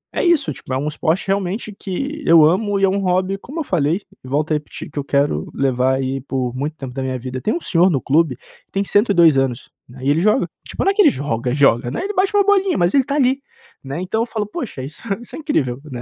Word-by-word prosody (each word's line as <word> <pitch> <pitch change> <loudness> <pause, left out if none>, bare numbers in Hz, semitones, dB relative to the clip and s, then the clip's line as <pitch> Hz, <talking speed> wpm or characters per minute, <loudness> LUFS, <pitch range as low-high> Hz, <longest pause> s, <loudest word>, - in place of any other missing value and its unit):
é - - 0
isso 340 -5 +3
tipo - - -11
é - - +1
um 145 +3 -2
esporte 160 +4 -1
realmente 195 +2 -1
que 275 - -5
eu 165 -2 +7
amo 200 +5 +2
e - - -1
é 195 - +5
um 200 +1 0
hobby, 185 +1 0
como 280 +11 -8
eu - - -2
falei, 170 - 0 0.2
e - - -11
volto 150 +4 -1
a - - +4
repetir 150 0 -6
que 145 - -4
eu - - -2
quero 140 - 0
levar 130 -1 +1
aí 135 0 -2
por 130 -2 -3
muito 145 +4 -3
tempo 130 -4 -7
da 135 - -4
minha 130 -1 -2
vida. 130 +1 -6
Tem 215 - 0
um - - -1
senhor 175 +1 +3
no 140 -7 +1
clube 145 -3 +2 0.3
tem 195 - 0
102 180 - +4
anos, 135 -2 -1 0.2
né, 125 +2 -14
e 135 - +1
ele 145 +3 +3
joga, 215 +7 +3 0.2
tipo - - -3
não 390 - +3
é - - -2
que 420 - +5
ele 335 - +7
joga 125 - -2
joga 130 -4 +3
né, 125 - -3
ele 405 +2 -3
bate 390 +2 +1
uma 405 - +5
bolinha 390 -2 +3
mas 175 +1 +2
ele 270 -2 +4
tá 280 - -2
ali, 265 -1 +2 0.4
né. 140 +5 -5
Então 190 +5 -1
eu - - +1
falo: 220 -3 -3
"Poxa 210 - -6
isso 145 +4 -9 0.2
isso 240 - -11
é - - -7
incrível, 135 - -1
né!" 120 -2 -5
165 Hz, 260 wpm, -19 LUFS, 135-215 Hz, 0.4 s, eu